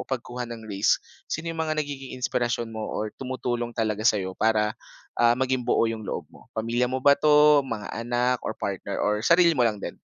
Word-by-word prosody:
pagkuha 125 -1 -4
ng 115 -1 -8
risk, 100 -1 +2 0.3
sino 165 +1 -3
'yong 165 - -5
mga 155 -1 -1
nagiging 140 -3 -4
inspirasyon 120 -2 -1
mo 110 -1 -4
or 110 0 -3
tumutulong 125 -2 -2
talaga 110 -2 0
sa'yo 100 -5 +2
para, 105 +1 +1 0.4
ah, 120 0 +4
maging 130 0 +1
buo 120 - +2
'yong 115 -1 -3
loob - - -3
mo? - - -18
Pamilya 120 +3 0
mo 130 - -1
ba 140 - +8
'to, 150 0 +6
mga 115 -5 -5
anak 120 +2 0
or 110 - -4
partner 100 0 -3
or 105 0 +1
sarili 170 +5 +5
mo 145 - -1
lang 115 -3 +2
din? - - -7
120 Hz, 195 wpm, -25 LUFS, 110-135 Hz, 0.4 s, ba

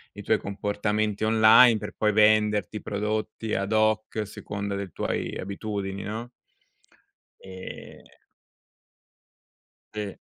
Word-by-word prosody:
i - - -8
tuoi - - +2
comportamenti 105 +1 -2
online, 110 +2 +7
per - - -7
poi 105 -1 +2
venderti 105 -1 +3
prodotti 110 +1 -3
ad 100 +2 -2
hoc, 110 0 +1
a 110 - 0
seconda 100 0 -5
dei 100 -2 -5
tuoi - - -3
abitudini, 100 0 -4
no? 110 +4 -5 1.1
Ehm 95 -1 -10 1.9
Sì. 105 -2 -5
105 Hz, 105 wpm, -26 LUFS, 100-110 Hz, 1.9 s, online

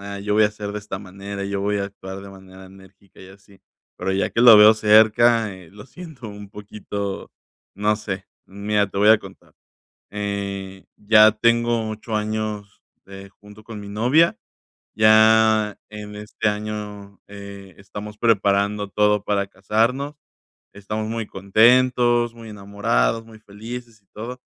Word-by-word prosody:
"Ah, 100 0 -7
yo 105 +1 -2
voy 110 - +4
a - - +5
hacer 105 -1 -7
de 105 - -5
esta 100 -2 -7
manera, 100 +1 -8
yo 100 0 -3
voy 105 +1 -1
a 100 - -2
actuar 95 -1 -9
de 100 - -11
manera 95 0 -14
enérgica 95 0 -19
y 95 - -13
así". 95 0 -19 0.4
Pero - - -3
ya 95 +1 -1
que - - -1
lo 120 -3 +9
veo 105 +1 +8
cerca, 110 0 +4
eh, 90 -3 -15
lo 105 +3 -14
siento 160 -8 -11
un 105 -1 -11
poquito, 100 -1 -7 0.5
no 105 +1 +1
sé. 100 -3 -6 0.2
Mira, 100 +1 -1
te 100 - -6
voy 105 +1 +4
a 110 - +6
contar, - - -15 0.6
eh, 100 -2 -5
ya 110 +1 +5
tengo 115 0 +1
8 110 +1 -6
años, 105 -1 -4 0.2
eh, 95 0 -12
junto 105 +1 -16
con 110 -1 -9
mi 100 - -10
novia. 125 +11 +2 0.6
Ya, 110 -1 +4
en 105 -1 -9
este 105 +1 -3
año, 105 -1 -6
eh, 100 -2 -11
estamos 105 +1 -10
preparando 100 -2 +1
todo 105 0 +1
para 100 -1 -1
casarnos. 115 +9 -1 0.6
Estamos 105 +2 -5
muy 115 0 -3
contentos, 120 +4 +2
muy 115 -1 -11
enamorados, 100 - -1
muy 110 -1 -15
felices 110 +1 -10
y - - -42
todo. 120 +4 -8
105 Hz, 155 wpm, -21 LUFS, 100-110 Hz, 0.6 s, lo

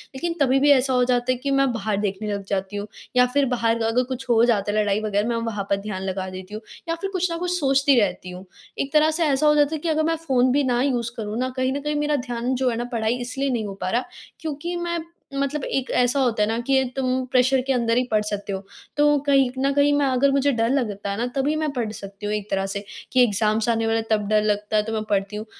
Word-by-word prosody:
लेकिन 335 +5 -2
तभी 270 0 +4
भी 290 +1 +5
ऐसा 265 -1 +3
हो 250 0 +3
जाता 245 0 +1
है 255 - 0
कि 275 +3 -3
मैं 275 -1 +3
बाहर 215 -2 -2
देखने 205 +1 -2
लग 200 -1 -4
जाती 195 0 -2
हूँ 205 +1 -4 0.3
या 250 0 +6
फिर 285 0 +3
बाहर 230 -1 +1
अगर 225 +3 +2
कुछ 260 +1 -6
हो 230 -1 +5
जाता 205 -4 +1
है, 210 - -1
लड़ाई 205 0 0
वग़ैरह 210 0 0
मैं 235 - 0
वहाँ 205 -3 -3
पर 200 - +3
ध्यान 200 -2 -5
लगा 190 0 -3
देती 185 +2 -9
हूँ 215 - -5 0.3
या 330 - +1
फिर 390 - -2
कुछ 365 -1 0
न 335 - -2
कुछ 355 +1 -2
सोचती 275 -2 +3
रहती 185 -3 -1
हूँ। 180 +1 -9 0.3
एक 275 - -2
तरह 310 +1 +5
से - - +3
ऐसा 295 0 +2
हो 300 - +5
जाता 295 +1 +3
है - - -4
कि 335 - -2
अगर 315 0 +1
मैं 325 +1 +1
फ़ोन 255 -1 +3
भी 285 +2 +2
ना 245 -2 +1
यूज़ 245 -4 0
करूँ 215 -1 -4
ना 255 +1 0
कहीं 260 0 +1
न 280 - -2
कहीं 300 +1 -2
मेरा 295 0 +1
ध्यान 245 -1 -2
जो 255 0 +1
है 235 - -2
ना 240 - -2
पढ़ाई 225 0 0
इसलिए 270 +3 -2
नहीं 235 -4 -1
हो 200 - -5
पा - - -1
रहा 240 +5 0 0.3
क्योंकि 320 +3 -4
मैं 345 0 -2 0.4
मतलब 280 +1 -1
एक 265 -1 -2
ऐसा 245 +3 +2
होता 235 -5 +2
है - - +1
ना 225 - 0
कि 265 -1 +3
तुम 260 -1 0
प्रेशर 260 +1 +3
के 270 - +2
अंदर 235 -2 +1
ही 250 - +3
पढ़ 215 -1 +3
सकते 205 -1 -4
हो 190 0 -4 0.3
तो 295 0 +4
कहीं 275 -2 +4
न 275 +1 +2
कहीं 285 +1 +3
मैं 285 0 +2
अगर 270 +1 +2
मुझे 280 +1 +2
डर 230 -2 +1
लगता 210 -7 -1
है 200 - -3
ना 240 +2 -1
तभी 280 +3 +1
मैं 310 -1 -1
पढ़ 235 -5 -2
सकती 200 -1 -9
हूँ 210 - -1
एक 210 0 -5
तरह 195 0 0
से 200 - -3 0.3
कि 255 -1 +5
एग्जाम्स 215 0 +1
आने 225 -1 +1
वाले 225 0 +2
हैं 225 - -5
तब 210 -2 +1
डर 215 0 +3
लगता 210 0 0
है, 210 - +3
तो 225 +1 -5
मैं 215 -1 -1
पढ़ती 200 0 0
हूँ, 210 +1 -5
245 Hz, 275 wpm, -23 LUFS, 210-275 Hz, 0.4 s, या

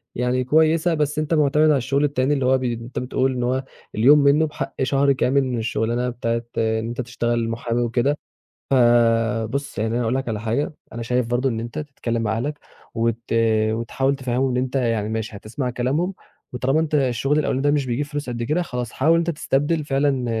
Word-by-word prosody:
يعني 125 +1 0
كويسة، 160 +5 +3
بس 150 -1 0
أنت 155 +1 -1
مُعتمد 150 0 +3
على 150 - +4
الشُغل 135 +3 0
التاني 145 -1 +1
اللي 135 -3 0
هو 130 +1 +4
بي 125 -2 -1
أنت 115 +2 -6
بتقول 130 +1 0
إن 125 -1 -2
هو 130 +2 0 0.3
اليوم 135 +7 +6
منّه 145 +2 +4
بحق 150 - -5
شهر 140 +1 +2
كامل 135 +1 +2
من 130 -2 -2
الشُغلانة 115 +2 -1
بتاعة 115 -1 -2
إن 110 0 0
أنت 120 +2 -3
تشتغل 120 -1 -1
مُحامي 115 +1 -2
وكده. 120 +5 +1 0.5
فبُص، 120 0 +2
يعني 110 +2 -1
أنا 120 - 0
هاقول 115 +1 0
لك 135 -1 -2
على 110 -2 -2
حاجة، 115 +8 -1 0.2
أنا 115 - -5
شايف 125 +1 0
برضه 120 +3 +1
إن 115 - -3
أنت 120 +6 -5
تتكلِّم 130 -6 -3
مع 110 0 -1
اهلك 150 +5 -3 0.4
وت 115 0 0 0.5
وتحاول 135 +5 -1
تفهِّمهم 130 0 -1
إن 125 - -1
أنت 130 +1 -2
يعني 115 -5 0
ماشي، 110 -1 -4
هتسمع 125 +6 -4
كلامهم، 135 +10 -1 0.4
وطالما 130 +4 +1
أنت 160 -1 0
الشُغل 135 +1 +1
الأولاني 135 -3 0
ده 145 - +3
مش 145 -2 +1
بيجيب 125 +4 -1
فلوس 145 -2 -5
قد 120 -1 -3
كده، 155 +9 0
خلاص 125 -7 -4
حاول 155 +5 +2
إن - - +4
أنت 170 0 0
تستبدل 150 0 0
فعلًا 135 -2 +1
125 Hz, 200 wpm, -22 LUFS, 115-145 Hz, 0.5 s, اليوم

